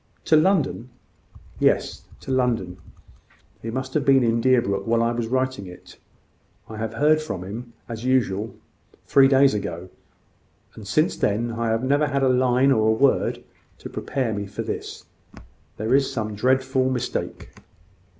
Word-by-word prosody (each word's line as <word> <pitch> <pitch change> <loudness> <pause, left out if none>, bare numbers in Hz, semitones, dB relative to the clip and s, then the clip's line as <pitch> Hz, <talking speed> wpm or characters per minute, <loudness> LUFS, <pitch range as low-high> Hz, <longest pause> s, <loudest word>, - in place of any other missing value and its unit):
"To 160 - +4
London?" 155 - +1 0.7
"Yes, - - +1 0.2
to - - -6
London. 115 -8 0 0.8
He 115 - -5
must 130 +3 -4
have 150 - +1
been 135 -2 +4
in 115 0 +1
Deerbrook 115 -6 +1
while 115 0 +2
I 115 - +1
was 120 -1 -3
writing 130 -4 -2
it. 90 - -14 0.7
I 110 - -9
heard 140 +8 +1
from 100 - -5
him, 115 +5 -8
as 115 -1 -7
usual, 115 -5 0 0.5
three 135 -1 +5
days 135 -1 +4
ago; 95 -3 -5 0.8
and - - -11
since - - +1
then, 115 +4 -1
I 115 0 -2
have 115 +2 0
never 145 +3 +2
had 140 -1 -1
a 130 - +4
line 130 +1 +3
or 110 -4 +3
a - - +4
word 135 +4 +1 0.3
to - - -10
prepare 130 -5 -2
me 100 -1 -4
for 100 - -5
this. - - -6 0.7
There 110 +4 -1
is 135 0 +3
some 110 -3 -3
dreadful 130 +3 +1
mistake." 125 -1 -4
125 Hz, 155 wpm, -23 LUFS, 110-130 Hz, 0.8 s, three